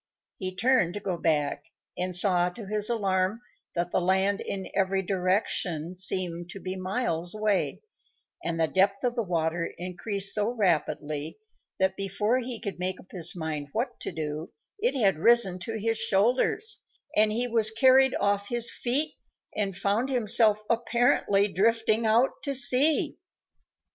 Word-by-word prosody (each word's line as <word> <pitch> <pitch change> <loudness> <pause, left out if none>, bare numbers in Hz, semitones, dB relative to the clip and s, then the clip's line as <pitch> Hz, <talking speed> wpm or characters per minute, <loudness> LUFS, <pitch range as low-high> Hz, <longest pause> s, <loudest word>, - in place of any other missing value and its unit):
He 185 -1 -3
turned 215 -4 +1
to - - -3
go 190 -3 -3
back, 150 -3 -1 0.3
and 180 0 0
saw, 180 -1 +4
to 210 +4 -10
his 210 +2 0
alarm, 195 -2 -1 0.4
that 175 0 -2
the - - 0
land 190 +2 +1
in 190 -1 -5
every 190 0 0
direction 180 -3 -1
seemed 180 -2 0
to 195 - -8
be 185 0 -5
miles 185 -2 -1
away, 210 -2 -1 0.6
and 165 -1 -3
the 165 - +3
depth 195 +3 +1
of 245 -1 0
the 240 - -2
water 170 -3 -2
increased 195 +3 0
so 210 +1 0
rapidly 155 -5 -1 0.4
that, 190 0 +1
before 210 +5 0
he 245 -2 -4
could 200 -5 -6
make 185 +1 -2
up - - -17
his 175 -2 0
mind 155 -4 -4
what 245 +2 -3
to - - -5
do, 155 0 -5 0.3
it 470 +4 0
had 195 -8 +2
risen 205 -3 +4
to 220 +5 -5
his 225 +1 -1
shoulders, 235 - +1 0.4
and 215 0 +4
he 240 +3 +1
was 225 -2 +4
carried 260 +3 +4
off 200 0 0
his 240 -1 +2
feet 285 +6 0 0.4
and 200 -3 -2
found 205 +8 -1
himself 220 -3 +4
apparently 230 -3 +1
drifting 225 +2 +1
out 235 +5 +1
to 280 -2 -1
sea. 265 +4 +3
200 Hz, 155 wpm, -26 LUFS, 180-230 Hz, 0.6 s, saw